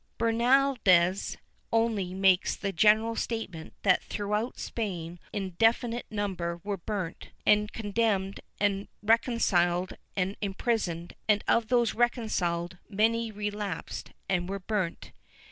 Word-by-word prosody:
^ - - -46
Bernaldez 230 -6 +3 0.3
only 220 -5 +1
makes 190 -1 +3
the 200 - -3
general 215 +5 +4
statement 220 -9 -4
that 185 -3 +4
throughout 210 +3 -2
Spain 175 -6 -4
an 195 -2 -3
infi 225 +6 +3
nite 240 +1 -5
number 185 -5 -2
were 200 -1 -2
burnt 185 -2 -5 0.2
and 210 0 +4
condemned 205 -3 0 0.2
and 200 -1 +1 0.2
reconciled 190 -6 +2 0.2
and 195 +1 -1
imprisoned, 195 -4 -1 0.2
and 210 -1 +4
of 230 -1 +3
those 240 -2 +2
reconciled 185 -7 0
many 225 +2 +1
relapsed 205 -3 -4 0.2
and 180 -2 0
were 200 - -2
burnt. 190 -3 -3
205 Hz, 120 wpm, -29 LUFS, 185-225 Hz, 0.3 s, general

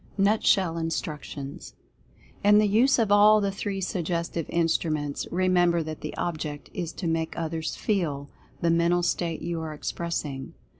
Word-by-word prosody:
NUTSHELL 195 -4 +3
INSTRUCTIONS. 150 -3 -5 0.7
In 205 +1 +6
the 210 0 +4
use 240 +7 +4
of 225 -4 +1
all 210 +1 +7
the 200 -1 0
three 195 0 -3
Suggestive 170 -3 -2
Instruments, 160 -3 0
remember 175 -2 +2
that 155 0 -7
the - - -6
object 155 -4 -4
is 175 -4 -3
to 185 - -6
make 165 -1 -1
others 160 -1 -3
FEEL 155 -9 -1 0.3
the 170 - +3
Mental 170 +1 +2
State 170 -2 -1
you 170 -1 -2
are 155 -1 -5
expressing. 150 -4 -4
170 Hz, 145 wpm, -26 LUFS, 160-195 Hz, 0.7 s, all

